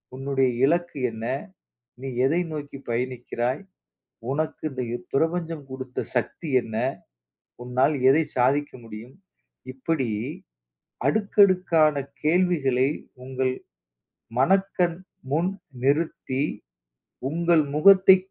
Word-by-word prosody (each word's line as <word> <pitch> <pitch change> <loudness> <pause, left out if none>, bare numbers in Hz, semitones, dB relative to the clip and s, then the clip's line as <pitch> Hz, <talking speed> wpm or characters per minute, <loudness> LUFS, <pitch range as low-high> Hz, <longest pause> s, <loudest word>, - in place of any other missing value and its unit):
உன்னுடைய 135 0 +1 0.2
இலக்கு 170 -1 0
என்ன? 110 0 -6 0.8
நீ 135 - -5 0.2
எதை 160 +6 +2
நோக்கி 145 -2 -6
பயணிக்கிறாய்? 125 +3 -2 0.7
உனக்கு 155 +3 -2
இந்த 130 -1 -4
யுப் 120 0 -6
பிரபஞ்சம் 165 0 0
கொடுத்த 130 -1 -5
சக்தி 125 +6 -2
என்ன? 110 -2 -7 0.9
உன்னால் 130 +4 +2 0.2
எதை 155 +4 +5
சாதிக்க 140 +4 +2
முடியும்?" 115 +3 -10 0.6
இப்பிடி 135 0 -1 1.0
அடுக்கடுக்கான 185 -3 +4 0.3
கேள்விகளை 150 -6 +2 0.4
உங்கள் 130 0 -1 0.8
மனக்கண் 180 +2 +2 0.3
முன் 170 +6 +1 0.3
நிறுத்தி 140 -2 0 0.9
உங்கள் 170 +1 +3
முகத்தை 190 +3 +8
145 Hz, 90 wpm, -25 LUFS, 130-170 Hz, 1.0 s, முகத்தை